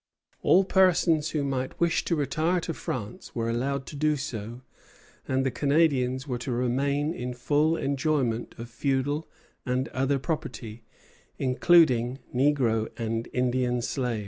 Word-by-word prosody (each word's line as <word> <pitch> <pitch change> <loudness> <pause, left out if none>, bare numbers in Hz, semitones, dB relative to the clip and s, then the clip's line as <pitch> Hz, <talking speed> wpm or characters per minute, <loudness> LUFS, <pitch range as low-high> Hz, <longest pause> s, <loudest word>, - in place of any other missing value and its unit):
All 190 - +5
persons 175 -5 +3
who 150 -2 -1
might 130 -2 -3
wish 170 -1 +2
to 170 - +1
retire 155 +5 0
to 165 - -3
France 120 -7 -6
were 115 0 -1
allowed 135 +3 -1
to - - -9
do 150 +1 +2
so, 120 -3 -6 0.7
and 130 0 +1
the 135 - +1
Canadians 135 -1 +1
were 125 -3 -2
to 130 - -4
remain 140 +5 0
in 125 -6 -5
full 150 +6 +2
enjoyment 135 -5 -1
of 115 0 -7
feudal 140 +5 -1 0.3
and 130 +1 -1
other 135 +2 0
property, 125 -6 -5 0.5
including 130 -2 +4 0.2
negro 125 -5 +2
and 115 0 -2
Indian 125 0 0
slaves. 125 -3 -1
135 Hz, 140 wpm, -27 LUFS, 125-150 Hz, 0.7 s, All